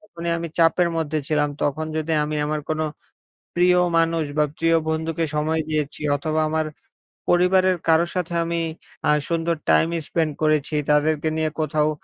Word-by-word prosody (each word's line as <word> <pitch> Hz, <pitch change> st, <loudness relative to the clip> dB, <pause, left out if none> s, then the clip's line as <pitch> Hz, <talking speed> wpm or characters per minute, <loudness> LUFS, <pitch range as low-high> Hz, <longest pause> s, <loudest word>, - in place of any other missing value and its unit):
যখনই 170 Hz, -4 st, -6 dB
আমি 170 Hz, 0 st, -4 dB
চাপের 170 Hz, +1 st, +4 dB
মধ্যে 155 Hz, -1 st, -1 dB
ছিলাম, 150 Hz, -1 st, +2 dB
তখন 155 Hz, +2 st, -1 dB
যদি 160 Hz, +1 st, -1 dB
আমি 150 Hz, 0 st, -3 dB
আমার 155 Hz, 0 st, -1 dB
কোনো 155 Hz, 0 st, 0 dB, 0.7 s
প্রিয় 180 Hz, +1 st, +4 dB, 0.2 s
মানুষ 165 Hz, -1 st, +2 dB
বা, 150 Hz, -, +4 dB
প্রিয় 165 Hz, 0 st, +3 dB
বন্ধুকে 160 Hz, +1 st, -1 dB
সময় 160 Hz, +1 st, 0 dB
দিয়েছি 150 Hz, -2 st, -2 dB
অথবা, 155 Hz, +2 st, -1 dB
আমার 160 Hz, -1 st, 0 dB, 0.6 s
পরিবারের 185 Hz, +1 st, +4 dB
কারোর 165 Hz, +1 st, +4 dB
সাথে 175 Hz, -2 st, -2 dB
আমি 170 Hz, 0 st, -1 dB, 0.5 s
আ -, -, +6 dB, 0.2 s
সুন্দর 165 Hz, 0 st, 0 dB
টাইম 165 Hz, -, +4 dB, 0.2 s
স্পেন্ড 160 Hz, -2 st, 0 dB
করেছি, 155 Hz, -1 st, +1 dB, 0.2 s
তাদেরকে 150 Hz, +1 st, +2 dB
নিয়ে 160 Hz, -1 st, +1 dB
কোথাও 155 Hz, 0 st, +1 dB
160 Hz, 155 wpm, -23 LUFS, 155-170 Hz, 0.7 s, আ